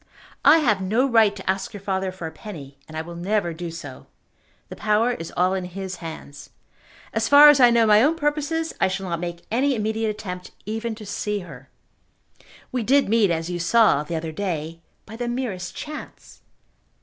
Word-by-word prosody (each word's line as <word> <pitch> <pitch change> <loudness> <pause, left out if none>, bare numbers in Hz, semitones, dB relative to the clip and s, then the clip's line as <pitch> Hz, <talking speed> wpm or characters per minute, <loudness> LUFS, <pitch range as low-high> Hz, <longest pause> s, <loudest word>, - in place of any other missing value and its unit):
I 305 +3 +8
have 225 -11 +2
no 220 +8 +1
right 225 -5 +4
to 190 - -10
ask 195 +3 -2
your 205 - -8
father 190 -1 -2
for 185 -2 -8
a 160 - -5
penny, 155 -5 -10
and 155 - -8
I 160 - -2
will 170 +1 -9
never 175 0 -1
do 170 +1 -6
so. 155 -5 -9 0.6
The - - -8
power 215 +3 +2
is 165 -9 -6
all 185 +1 +3
in 190 -1 -2
his 190 +1 -6
hands. 160 -3 -9 0.6
As 225 0 0
far 290 +1 +10
as 295 -2 +5
I 245 -2 +7
know 235 -1 +4
my 210 0 +6
own 300 +6 +3
purposes, 310 +1 -1
I - - +5
shall 190 0 -4
not 170 -2 -2
make 175 0 -6
any 265 +4 +2
immediate 220 0 -1
attempt 180 -4 -6
even 225 +1 -3
to 215 -1 -10
see 205 +1 -3
her. 135 -7 -12 1.0
We 250 - -1
did 270 +2 +3
meet, 220 -3 +3
as 165 +1 -2
you 175 - -3
saw, 180 -3 +4
the 150 +3 -5
other 160 0 -4
day, 165 -2 -4 0.2
by 225 - -10
the 240 0 -3
merest 235 -8 -4
chance. 305 0 -9
200 Hz, 195 wpm, -23 LUFS, 170-230 Hz, 1.0 s, far